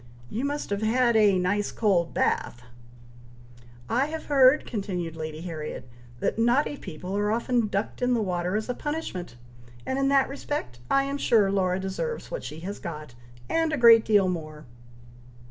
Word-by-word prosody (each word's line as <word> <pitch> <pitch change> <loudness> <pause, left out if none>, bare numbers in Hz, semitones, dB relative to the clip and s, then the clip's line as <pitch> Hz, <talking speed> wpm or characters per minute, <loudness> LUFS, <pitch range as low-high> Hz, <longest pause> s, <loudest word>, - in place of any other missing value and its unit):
You 245 +5 -2
must 290 -5 -3
have 200 +1 -1
had 235 +2 +2
a 205 -3 +5
nice 200 +3 0
cold 185 -6 +1
bath!" 120 +1 -1 1.2
"I 260 +5 +1
have 320 +1 -6
heard," 275 0 +5
continued 180 -7 -4
Lady 155 -1 -6
Harriet, 155 -6 -6 0.3
"that - - -1
naughty 245 +6 +2
people 185 - -7
are 205 +1 +1
often 235 0 +1
ducked 200 +4 -3
in 250 0 +2
the - - +1
water 180 0 -1
as 215 0 -2
a 250 - -1
punishment, 270 - -5 0.5
and 265 - -1
in 275 - +2
that 275 -1 +4
respect 275 - -5
I 275 - +3
am 280 +1 -3
sure 210 -7 +3
Laura 185 -2 +1
deserves 195 - -4
what - - -4
she 155 - -7
has 200 +4 -6
got, 155 -6 -7 0.3
and 325 -1 +1
a 305 - 0
great 230 -2 +8
deal 205 -3 +3
more." 155 -4 -5
210 Hz, 170 wpm, -26 LUFS, 180-260 Hz, 1.2 s, great